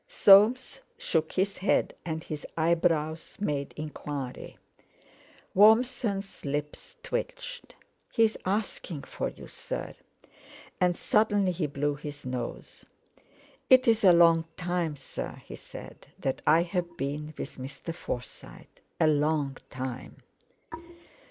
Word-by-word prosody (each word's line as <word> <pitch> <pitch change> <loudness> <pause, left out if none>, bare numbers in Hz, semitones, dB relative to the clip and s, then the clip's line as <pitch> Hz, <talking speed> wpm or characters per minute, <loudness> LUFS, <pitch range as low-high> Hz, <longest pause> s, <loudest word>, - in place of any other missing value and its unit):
Soames 255 - +6 0.2
shook 160 -1 -1
his 195 +1 0
head, 195 - +2
and 160 -1 -4
his 150 -1 -6
eyebrows 165 -1 +1
made 145 -8 -2
enquiry. 145 -3 -6 1.0
Warmson's 220 -1 +3
lips 150 - -4
twitched. - - -5 0.4
"He's 225 -1 +3
asking 190 -6 -2
for - - -3
you, - - -12
sir;" - - -6 0.9
and 180 -1 +2
suddenly 205 -3 +2
he 170 -3 -1
blew 145 +1 -1
his 145 -1 -8
nose. 125 -2 -6 0.8
"It's 235 -4 +5
a 190 - +8
long 165 -1 +6
time, 175 -3 -1
sir," 135 - -7
he - - -8
said, - - -11
"that 135 - -2
I've 170 +1 +2
been 150 +2 -4
with - - -6
Mr. 135 +5 -6
Forsyte—a 125 +1 -6
long 150 -2 +1
time." 130 0 -6
165 Hz, 105 wpm, -28 LUFS, 145-200 Hz, 1.0 s, a